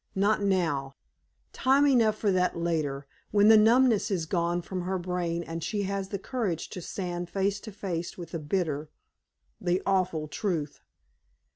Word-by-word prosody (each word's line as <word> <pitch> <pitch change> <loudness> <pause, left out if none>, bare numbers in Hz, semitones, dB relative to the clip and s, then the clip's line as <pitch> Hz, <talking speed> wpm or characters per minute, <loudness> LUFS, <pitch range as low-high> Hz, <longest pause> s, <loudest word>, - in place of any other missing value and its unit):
Not 205 +2 +2
now; 165 -9 0 0.6
time 275 +2 +3
enough 230 -6 +4
for 210 -2 +1
that 180 -2 +1
later, 155 -5 -1 0.2
when 205 0 +5
the 220 - +9
numbness 230 +1 +5
is 180 -5 -1
gone 170 +1 0
from 185 +1 -4
her 185 +2 -1
brain 175 -1 -2
and 165 0 -6
she 205 +4 -1
has 195 0 -3
the 200 - -2
courage 195 -5 -3
to 180 - -6
stand 175 -1 -4
face 200 +1 0
to 215 - -9
face 180 -4 -4
with 175 -2 -8
the 165 - -3
bitter 155 -2 -2 0.7
the 175 +1 +1
awful 180 -5 +1
truth. 155 -3 -3
185 Hz, 160 wpm, -28 LUFS, 170-205 Hz, 0.7 s, the